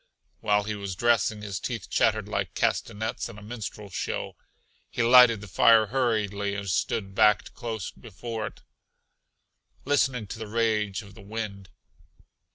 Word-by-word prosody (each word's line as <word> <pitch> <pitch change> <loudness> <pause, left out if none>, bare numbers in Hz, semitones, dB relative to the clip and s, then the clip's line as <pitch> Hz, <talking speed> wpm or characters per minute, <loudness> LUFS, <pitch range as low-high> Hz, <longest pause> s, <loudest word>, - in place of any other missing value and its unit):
While 105 -1 +2
he 105 +1 -3
was 100 -3 -5
dressing 110 -1 +2
his 100 -3 -4
teeth - - -4
chattered - - +2
like - - -3
castanets 110 +3 -1
in 110 - -11
a 105 - -11
minstrel 105 -2 -7
show. - - -3 0.5
He 120 - -1
lighted 120 -2 +7
the 105 - -9
fire 110 +4 +5
hurriedly 105 -6 0
and 100 0 -5
stood 95 +1 -1
backed 105 0 +3
close 110 -5 -5
before 110 +1 -6
it, - - -12 1.2
listening 130 -5 +1
to 105 - -8
the 110 - -5
rage 105 -3 0
of 100 -1 -14
the 110 - -13
wind. 100 -2 -6
105 Hz, 150 wpm, -27 LUFS, 100-115 Hz, 1.2 s, lighted